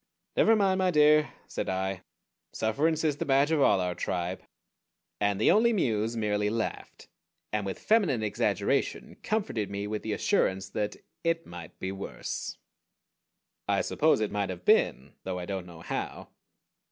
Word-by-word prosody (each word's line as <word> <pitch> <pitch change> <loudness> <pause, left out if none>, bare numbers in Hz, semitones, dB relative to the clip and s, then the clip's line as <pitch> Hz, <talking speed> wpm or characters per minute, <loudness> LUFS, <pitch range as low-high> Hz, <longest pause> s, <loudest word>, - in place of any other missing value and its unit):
"Never 225 - +5
mind, 195 -3 +2
my 185 -1 +3
dear," 150 -1 +5
said - - -4
I. 95 0 -2 0.5
"Sufferance 150 +9 +1
is 150 -3 +1
the - - -2
badge 140 +2 +3
of 155 -3 +3
all 100 - +5
our 90 -1 -1
tribe." 90 +1 -3 0.8
And 100 -1 +1
the - - +5
Only 235 +3 +4
Muse 115 - 0
merely 105 -1 +1
laughed, 115 0 -4 0.5
and 105 -2 -1
with 95 - -4
feminine 180 - +2
exaggeration 105 - -1
comforted 195 - -1
me 100 0 -3
with 105 0 -3
the 110 - -3
assurance 95 -1 +1
that 105 -1 -2 0.3
"it 165 0 0
might 85 -1 -10
be 95 - -3
worse." 95 0 -5 1.1
I - - +2
suppose - - +2
it 105 - 0
might 100 -1 -1
have 90 -1 -7
been; 65 +2 +3
though 95 -1 -3
I 90 - -4
don't 95 -2 -4
know 85 -2 -12
how. - - -5
105 Hz, 160 wpm, -29 LUFS, 95-150 Hz, 1.1 s, Never